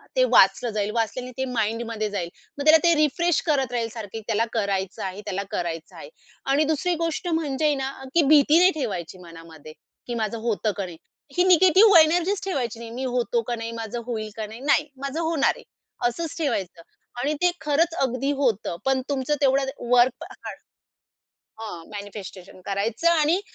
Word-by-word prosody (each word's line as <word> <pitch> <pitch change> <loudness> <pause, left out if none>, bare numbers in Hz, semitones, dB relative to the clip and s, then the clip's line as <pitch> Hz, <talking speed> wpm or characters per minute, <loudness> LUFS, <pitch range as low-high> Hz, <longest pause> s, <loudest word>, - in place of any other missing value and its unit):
ते - - +4
वाचलं 245 - +5
जाईल. 210 0 -1
वाचल्याने 235 +3 -2
ते 265 - -1
माइंडमध्ये 230 -2 -2
जाईल. 190 -4 -3 0.3
मग 285 - -3
त्याला 310 +1 +8
ते 340 -1 +5
रिफ्रेश 315 +3 +2
करत 275 -6 +1
राहील 235 -2 -1
सारखं 225 -2 -7
त्याला 225 0 +1
करायचं 195 -3 -2
आहे, 190 +2 -5
त्याला 200 -1 -3
करायचं 165 -2 -4
आहे. - - -10 0.4
आणि 275 +3 +3
दुसरी 335 +4 +1
गोष्ट 330 +2 -2
म्हणजे 315 -3 -1
आहे 300 -1 +3
ना, 270 0 -3 0.2
की 340 - +6
भीती 300 +1 +6
नाही 365 +1 +6
ठेवायची 190 - -4
मनामध्ये 165 -3 -12 0.3
की 240 - -3
माझं 225 0 -2
होतं 215 -1 0
का 200 - -2
नाही. 175 -3 -10 0.4
ही 360 - +5
निगेटिव्ह 370 +3 +7
एनर्जीच 350 +5 +3
ठेवायची 250 - -2
नाही. 230 -1 -8
मी 250 +3 -5
होतो 240 -1 0
का 240 - 0
नाही? 230 0 -5
माझं 225 +2 -5
होईल 220 -3 -4
का 220 - -3
नाही? 220 +2 -10
नाही. 290 +2 +2 0.2
माझं 275 +3 -3
होणार 325 -3 +2
आहे. - - -14 0.5
असंच 330 +6 -5
ठेवायचं 195 - -2 0.4
आणि 285 +4 0
ते 355 0 +4
खरंच 315 +3 +1
अगदी 265 +1 0
होतं. 220 -9 0
पण 265 -1 +2
तुमचं 280 +1 0
तेवढं 270 0 +3 0.3
वर्कहार्ड 250 +1 +1 1.0
हां. 190 -7 -7
मॅनिफेस्टेशन 200 -2 -9
करायचं 210 - 0
आणि 330 +2 +3
245 Hz, 175 wpm, -24 LUFS, 210-305 Hz, 1.0 s, त्याला